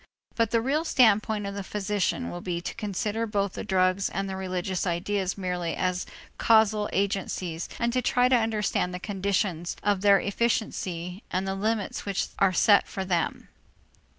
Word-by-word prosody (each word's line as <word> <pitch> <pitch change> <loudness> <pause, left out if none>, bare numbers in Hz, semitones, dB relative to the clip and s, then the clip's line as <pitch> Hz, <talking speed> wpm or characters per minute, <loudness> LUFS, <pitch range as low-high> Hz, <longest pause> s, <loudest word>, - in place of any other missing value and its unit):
But 230 -2 +1
the 230 +1 +2
real 285 +6 0
standpoint 215 -7 +3
of 200 - -4
the 200 - -4
physician 210 +4 -1
will 175 - -6
be 175 -1 -2
to 175 - -5
consider 215 +1 -2
both 200 -2 -1
the - - -5
drugs 185 +1 +2
and 195 0 -3
the 190 - -4
religious 185 0 -2
ideas 185 +2 -1
merely 180 -3 -2
as 180 -1 -1 0.3
causal 220 -2 +4
agencies 185 -4 -2
and 235 0 0
to 255 - +2
try 250 0 +3
to 255 - +4
understand 215 -5 0
the - - -5
conditions 190 -3 -1
of 200 -2 +1
their 200 -1 +6
efficiency 195 -5 -2
and 185 +2 -1
the 195 - -1
limits 210 +1 -2
which 200 -2 -2
are 195 -1 +4
set 200 +3 +4
for 190 -1 -4
them. 175 -3 -1
200 Hz, 170 wpm, -27 LUFS, 185-215 Hz, 0.3 s, their